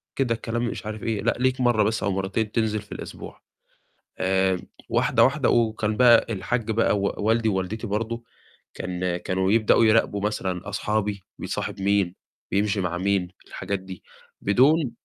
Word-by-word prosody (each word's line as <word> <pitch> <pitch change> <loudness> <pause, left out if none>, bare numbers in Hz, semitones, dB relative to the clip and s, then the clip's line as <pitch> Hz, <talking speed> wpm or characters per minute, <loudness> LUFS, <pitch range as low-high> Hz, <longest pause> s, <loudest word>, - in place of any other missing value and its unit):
كده 120 -4 +1
الكلام 120 +1 -2
مش 110 - -5
عارف 110 0 -6
إيه، 110 -2 -1
لأ، 115 - +2
ليك 130 0 +1
مرّه 120 -4 +3
بس 110 +1 0
أو 100 - +1
مرّتين 100 +3 -2
تنزِل 110 -2 0
في 105 - -20
الأسبوع. - - -8 0.8
آمم 95 -1 +1 0.3
واحدة، - - +3
واحدة 140 +1 +2
وكان 110 -2 +1
بقى 120 -2 +6
الحاج 115 +3 -2
بقى 110 -2 +2
و 100 - 0
والدي 110 +1 +2
ووالدتي 100 +4 -2
برضه، 115 +3 -3 0.5
كان 90 -1 -3
كانوا 95 +2 -1
يبدأوا 115 0 +4
يراقبوا 110 -2 +3
مثلًا 95 -2 -2
أصحابي، 105 0 -1 0.2
بيصاحب - - -4
مين؟ 100 -2 +1 0.4
بيمشي 100 0 +1
مع 90 -1 -2
مين؟ 95 0 0 0.2
الحاجات 100 -1 -4
دي 95 -1 -10 0.4
بدون 135 +6 +3
105 Hz, 155 wpm, -24 LUFS, 95-115 Hz, 0.8 s, بقى